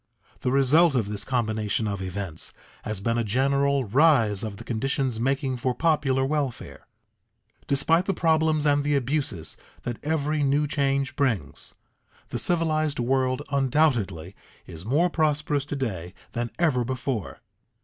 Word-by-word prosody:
The 125 - -1
result 140 +4 +4
of 110 -5 0
this 105 -1 -4
combination 110 -3 -1
of 100 -2 -3
events 95 -3 -5 0.3
has 105 -2 -2
been 115 +3 0
a - - +1
general 140 +4 +1
rise 115 -4 +3
of 105 -3 -5
the 115 - -9
conditions 125 +1 -1
making 135 +1 0
for 125 +1 -1
popular 140 -4 +2
welfare. 140 -3 -3 0.8
Despite 160 +6 +2
the 195 - +2
problems 160 -2 +2
and 145 -1 +3
the 145 0 +1
abuses 135 - -2 0.3
that 120 -2 -5
every 150 0 0
new 145 +1 +2
change 140 -3 0
brings, 115 - -2 0.5
the - - -3
civilized 155 -3 +1
world 130 +1 0
undoubtedly 130 - +1 0.3
is 85 +4 -10
more 155 +8 +3
prosperous 150 -3 0
to 145 - -4
day 95 -10 -4 0.2
than 120 0 -2
ever 150 -8 +2
before. 125 - -3
135 Hz, 140 wpm, -25 LUFS, 115-145 Hz, 0.8 s, result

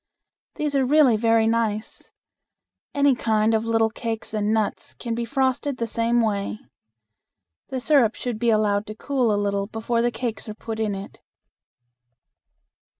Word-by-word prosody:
These 295 -1 -2
are 270 - +3
really 270 -2 +5
very 225 0 +3
nice. 225 -1 -2 0.8
Any 285 -1 +4
kind 220 -2 +1
of 220 0 +1
little 225 -1 +2
cakes 225 -1 -5
and 210 0 0
nuts 220 -1 -2
can 235 -2 -4
be 235 +1 -2
frosted 265 +1 0
the 235 - -1
same 230 +1 +1
way. 205 -2 -1 1.1
The 260 - -3
syrup 250 -4 +3
should 240 -3 -4
be 235 0 +2
allowed 215 -1 +2
to 215 - -7
cool 255 -1 0
a 205 - +1
little 200 -1 -1
before 225 +2 -1
the 240 - +2
cakes 225 -2 -4
are 210 - -6
put 225 0 -6
in 215 -2 -1
it. 195 0 -9
225 Hz, 155 wpm, -23 LUFS, 215-245 Hz, 1.1 s, really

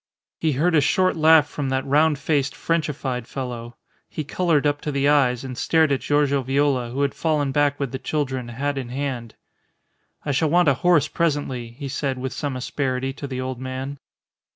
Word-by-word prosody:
He 155 -2 +1
heard 165 +7 +1
a 155 - +5
short 185 +5 +2
laugh 160 -1 +6
from 145 -2 -4
that 130 0 -1
round 150 +2 +3
faced, 140 -1 0
Frenchified 140 -7 -2
fellow. 120 -3 -6 0.3
He 155 - -4
coloured 155 -1 +1
up 145 0 +1
to 150 - -3
the 140 0 +1
eyes, 135 -4 +3
and 130 -1 -6
stared 160 +3 +2
at 135 - +1
Giorgio 145 -1 +2
Viola, 135 -2 +1
who 135 +4 -1
had 140 - 0
fallen 150 -4 0
back 145 0 +1
with 140 -4 -2
the 130 - -4
children, 130 -3 -2
hat 135 +4 -2
in 125 -3 -6
hand. 125 -4 -4 0.9
"I 145 - 0
shall 150 +3 +1
want 175 0 +4
a - - +4
horse 175 +2 +3
presently," 145 -7 -1
he 140 +3 -7
said 135 -1 -2
with 130 0 -4
some 135 0 -3
asperity 130 0 -2
to 140 - -7
the 130 -1 -4
old 130 -1 -4
man. 130 +2 -5
140 Hz, 195 wpm, -23 LUFS, 130-150 Hz, 0.9 s, laugh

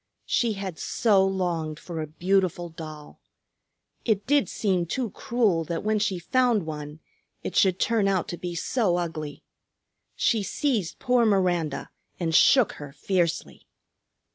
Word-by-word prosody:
She 235 -3 +1
had 195 -4 -6
so 205 -5 +3
longed 175 -5 -1
for 165 -1 -6
a 155 - -4
beautiful 175 +1 0
doll! 155 -2 -10 0.8
It 210 -4 0
did 290 0 +2
seem 185 -5 0
too 235 +3 -2
cruel 215 -9 +1
that 170 +1 -3
when 215 0 +1
she 205 -3 0
found 235 +1 +1
one 150 0 -7 0.4
it - - -5
should 190 -2 +4
turn 225 -3 +2
out 190 -3 +1
to 175 - -4
be 175 0 -5
so 185 0 +1
ugly. 155 -4 -4 0.7
She 225 - +2
seized 210 - -1
poor 250 -2 +2
Miranda 180 -8 +1 0.3
and 165 -2 -1
shook 245 - +6
her 145 -1 -7
fiercely. 170 +3 -2
185 Hz, 140 wpm, -26 LUFS, 165-215 Hz, 0.8 s, shook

